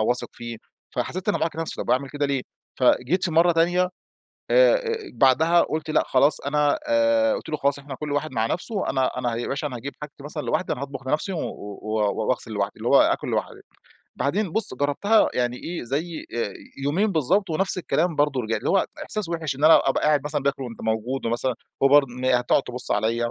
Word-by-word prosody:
واثق 120 +3 0
فيه 120 -1 -8 0.4
فحسيت 185 +3 -3
إن - - +3
أنا - - 0
باعاقب 165 0 -2
نفسي 165 - -3
طب - - -4
اعمل 135 +1 +1
كده 145 -1 -1
ليه؟ 135 -2 -1 0.4
فجيت 130 +8 +2
في 175 - 0
مرّة 170 +2 +4
تانية 170 +2 +2 0.7
آآ - - +6
آآ، 460 -2 -2 0.2
بعدها 160 +6 +4
قلت 155 0 -3
لأ 155 - +3
خلاص 140 +3 +3
أنا 145 +1 +1
آآ، 285 -1 +3
قلت - - -6
له 155 - -1
خلاص 140 0 +1
إحنا 140 -1 -8
كل 150 +1 -5
واحد 145 0 -2
مع 110 -1 0
نفسه 195 - -2
أنا 130 -1 +1
أنا 120 -2 -1
ياباشا 140 +5 -3
أنا 130 -4 -5
هاجيب 140 +4 -6
حاجتي 145 -1 -9
مثلًا 150 0 -5
لوحدي 185 - -1
أنا - - -8
هاطبخ 135 -1 -7
لنفسي 155 +7 0
و 170 - -3 0.4
و 110 -1 0
واغسل 125 -3 -1
لوحدي 100 -1 -1
اللي - - -3
هو - - +6
آكل - - +1
لوحدي، - - -3 0.6
بعدين 185 +5 -1
بُص 220 -9 +3
جربتها 145 - +2
يعني 125 0 -1
إيه 170 +1 -5
زي 155 +7 -4
آآ، 110 -4 -2 0.3
يومين 185 +10 +2
بالضبط 175 +5 +1
ونفس 185 +4 0
الكلام 170 -1 0
برضو 145 -2 +1
رجع 110 0 -1
اللي - - -3
هو 195 - +3 0.2
إحساس 210 -6 -4
وحش 160 -5 -2
إن 145 - -6
أنا 160 - +6
أبقى - - 0
قاعد 150 -2 +3
مثلًا 150 -2 -2
باكل 140 -1 -1
وأنت 115 -2 -8
موجود 110 +4 -2
ومثلًا 120 +2 0 0.3
هو - - +7
برضو 145 0 +5
م 125 - -4
هتقعد 125 +1 +2
تبص 125 0 -1
عليَّ 115 +3 0
145 Hz, 210 wpm, -24 LUFS, 125-170 Hz, 0.7 s, هو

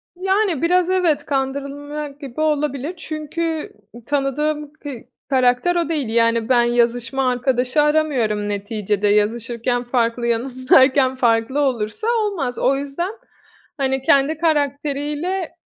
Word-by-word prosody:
Yani, 380 -3 0
biraz 360 +1 +2
evet, 360 -5 +1
kandırılmak 280 +1 -4
gibi 275 0 -6
olabilir. 300 0 -1
Çünkü 315 0 -4 0.3
tanıdığım 295 +2 -1
k 310 -1 -9 0.4
karakter 260 +6 +2
o 340 -2 0
değil. 290 -8 -1
Yani, 230 0 +2
ben 245 -2 +5
yazışma 240 +2 +1
arkadaşı 250 +2 +1
aramıyorum 265 -9 +1
neticede, 205 0 -1
yazışırken 230 +4 0
farklı, 240 -1 0
yanımdayken 260 +2 +3
farklı 235 +2 +1
olursa 250 - -1
olmaz. 405 - -1
O 270 - +3
yüzden, 285 +7 -3 0.7
hani, 265 -1 0
kendi 280 +3 +3
karakteriyle, 300 +3 -1
275 Hz, 110 wpm, -20 LUFS, 245-305 Hz, 0.7 s, ben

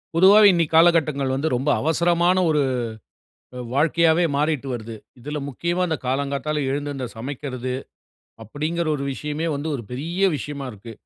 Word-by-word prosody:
பொதுவாவே, 200 +4 +7
இன்னைக்கி 165 -3 0
காலகட்டங்கள்ல 155 -5 +3
வந்து, 160 +4 0
ரொம்ப 135 +4 -1
அவசரமான 170 +3 +2
ஒரு 150 -2 +2 1.0
அ - - -6 0.2
வாழ்க்கையாவே 165 +3 +3
மாறிட்டு 150 -2 0
வருது. 115 -1 -6 0.3
இதுல 150 +4 -5
முக்கியமா 170 +7 -2
அந்த 160 -2 -1
காலங்காத்தால 140 +3 -1
எழுந்து 145 +1 -2
அந்த 130 -2 -4
சமைக்கிறது. 130 0 -5 0.7
அப்டின்கிற 155 +9 -3
ஒரு 140 - -4
விஷயமே 150 +4 -4
வந்து, 145 +3 -4
ஒரு 120 - -7
பெரிய 170 +10 0
விஷயமா 140 -1 -6
இருக்கு. 110 +2 -11
150 Hz, 140 wpm, -22 LUFS, 135-165 Hz, 1.0 s, பொதுவாவே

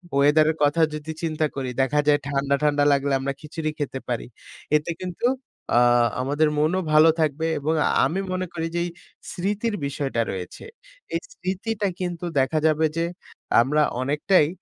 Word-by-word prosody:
ওয়েদারের 155 +3 +4
কথা 145 +3 +3
যদি 155 +1 -5
চিন্তা 155 -1 0
করি, 130 -2 -3
দেখা 145 +3 +1
যায় 145 0 +5
ঠান্ডা, 140 0 +1
ঠান্ডা 145 -1 +3
লাগলে 140 0 +1
আমরা 135 +1 -2
খিচুড়ি 155 0 -4
খেতে 135 -2 -3
পারি। 120 -2 -2 0.5
এতে 150 +3 -4
কিন্তু 180 +5 -4 0.5
আ - - +7 0.4
আমাদের 145 +4 +1
মনও 160 +5 +2
ভালো 155 +1 +7
থাকবে 155 +1 0
এবং 150 +3 0
আ - - +3 0.2
আমি 185 +4 -1
মনে 185 0 -1
করি 165 -1 -2
যে - - +1
এই - - -3 0.4
স্মৃতির 205 +4 -2
বিষয়টা 140 -3 -2
রয়েছে। 90 -2 -7 0.5
এই - - +1
স্মৃতিটা 205 - -2
কিন্তু 175 -1 -3
দেখা 135 +4 +1
যাবে 155 0 +2
যে, 165 - +1 0.6
আমরা 150 +5 +2 0.2
অনেকটাই 150 +4 +3
155 Hz, 160 wpm, -24 LUFS, 140-170 Hz, 0.6 s, আ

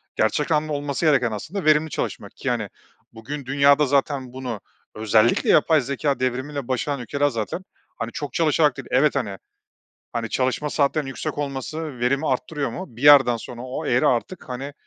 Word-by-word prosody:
Gerçek 145 +8 +1
anlamda 150 0 +1
olması 145 +2 -2
gereken 130 -6 +3
aslında 160 - -5
verimli 155 +1 +4
çalışmak. - - -5
Ki - - -3
hani, - - -1 0.4
bugün 135 +5 -7
dünyada 140 +2 +4
zaten 135 -2 0
bunu 125 -5 -5 0.3
özellikle 110 +1 +2
yapay 155 -1 +5
zekâ 140 +2 -1
devrimiyle 130 +2 -2
başaran 130 +2 -1
ülkeler 140 +4 0
zaten, 115 - -4 0.3
hani, 115 +1 -4
çok 145 -5 -6
çalışarak 155 -3 +2
değil. - - -8
Evet, 140 +4 +3
hani 100 -8 -2 0.8
hani, 115 -2 -2
çalışma 130 +3 -1
saatlerinin 145 0 +1
yüksek 145 +3 -5
olması 145 0 -4
verimi 135 +5 +1
arttırıyor 140 +1 -2
mu? 185 - -6
Bir 120 - -9
yerden 140 -5 +7
sonra 120 +1 -9
o 130 +4 -5
eğri 120 - +2
artık, 130 +7 -1
hani, 135 +3 -5
140 Hz, 165 wpm, -23 LUFS, 125-150 Hz, 0.8 s, yerden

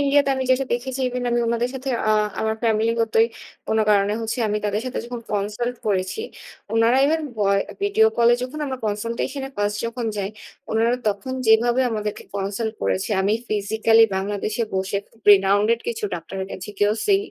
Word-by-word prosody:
India 285 0 +3
তে - - +2
আমি 260 - -1
যেটা 260 +1 +3
দেখেছি 255 +2 -2
ইভেন 250 0 -3
আমি 240 0 +2
উনাদের 235 +1 0
সাথে 265 +1 -5 0.2
আ - - +4 0.3
আমার 220 0 0
ফ্যামিলিগতই 225 0 +2 0.4
কোন 220 - +1
কারণে 200 0 +3
হচ্ছে 225 +2 -3
আমি 210 0 0
তাদের 210 +1 0
সাথে 255 - -3
যখন 240 0 -6
কনসাল্ট 210 +4 -2
করেছি। 190 - 0 0.5
উনারা 230 +3 +4
ইভেন 320 +2 +1
ভয় 200 -1 +2 0.2
ভিডীও 405 +2 +4
কল 235 0 +5
এ - - +6
যখন 255 +4 -5
আমরা 260 -1 -4
কনসাল্টেশন 230 +6 -2
এ - - -15
ফার্স্ট 205 0 0
যখন 230 0 -4
যাই, 200 0 -2 0.4
উনারা 225 +2 +2 0.2
তখন 205 +5 -3
যেভাবে 235 +3 +4
আমাদেরকে 210 -2 -3
কনসাল্ট 200 +3 -2
করেছে 190 +3 0
আমি 200 +2 +2 0.2
physically 220 +2 +3
বাংলাদেশে 205 +3 -2
বসে 190 +1 -1
খুব 225 - -26
renowned 200 +2 +5 0.2
কিছু 225 -2 -3
ডাক্তারের 190 +3 -5
কাছে 185 - -7
গিয়েও 205 +1 +3
সি 400 -1 +5
220 Hz, 175 wpm, -22 LUFS, 205-245 Hz, 0.5 s, এ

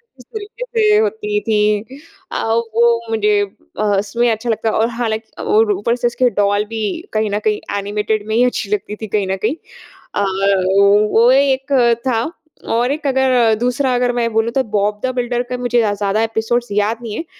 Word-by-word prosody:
किस 250 -2 -17
तरीके 435 +3 -6
से 435 -3 +2
होती 420 -1 0
थी। 210 +3 0 0.3
अ, - - -2 0.3
वो 235 0 +4
मुझे 210 -2 +2 0.4
अ, - - +1
उसमें 210 +3 +1
अच्छा 220 +2 -3
लगता 220 0 0
है - - -1
और 225 +1 +2
हालाँकि 225 -2 -4
और 220 0 +3
ऊपर 205 +5 -1
से 245 0 0
उसके 245 +1 +1
डॉल 205 +1 +1
भी 225 -1 -4 0.3
कहीं 215 0 0
न 205 - 0
कहीं 210 - -1 0.2
एनिमेटेड 210 +1 -2
में 220 - -1
ही 240 - +4
अच्छी 245 -4 -2
लगती 210 0 -2
थी 220 - -4
कहीं 200 -1 -1
न - - +1
कहीं। 245 +7 +1 0.6
अ, 205 - +1 0.9
वो 235 +2 +5
एक 270 0 +2 0.3
था 235 +4 0 0.4
और 240 +3 +1
एक 300 +2 -4
अगर 255 -4 +3
दूसरा 250 +2 0
अगर 245 0 +1
मैं 235 -1 0
बोलूँ 225 +1 +1
तो 265 +2 +1
बॉब 205 +1 0
दा 260 - 0
बिल्डर 245 -1 -1
का 250 - -2
मुझे 245 -1 0
या 210 -2 +1
ज़्यादा 205 +1 0
एपिसोड्स 225 +2 -1
याद 210 +3 +1
नहीं 225 -3 -6
हैं। 330 - -4
230 Hz, 195 wpm, -17 LUFS, 210-250 Hz, 0.9 s, वो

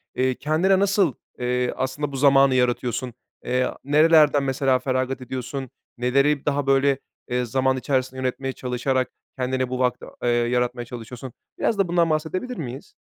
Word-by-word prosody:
eee, 130 0 +1
kendine 175 +6 +2
nasıl, 195 - +2 0.3
eee, 125 0 0
aslında 135 +2 -2
bu 135 - -6
zamanı 135 -1 +5
yaratıyorsun? 125 -1 0 0.3
Eee, 125 0 +1 0.2
nerelerden, 150 0 +5
mesela, 130 -1 +1
feragat 130 0 -1
ediyorsun? 130 +1 -5 0.3
Neleri 140 +4 +2
daha, 145 -1 0
böyle, 135 0 +3 0.3
eee, 125 0 0
zaman 130 +2 +1
içerisinde 130 -1 -1
yönetmeye 135 +1 -2
çalışarak 130 0 -1 0.3
kendine 130 0 -1
bu 130 0 -3
vakti, 125 -1 0 0.2
eee, 120 - +2
yaratmaya 120 +1 0
çalışıyorsun? 120 +1 -8 0.3
Biraz 220 - +1
da 195 -2 +2
bundan 170 -1 +2
bahsedebilir 175 +11 -2
miyiz? 135 -2 -7
130 Hz, 145 wpm, -23 LUFS, 125-145 Hz, 0.3 s, zamanı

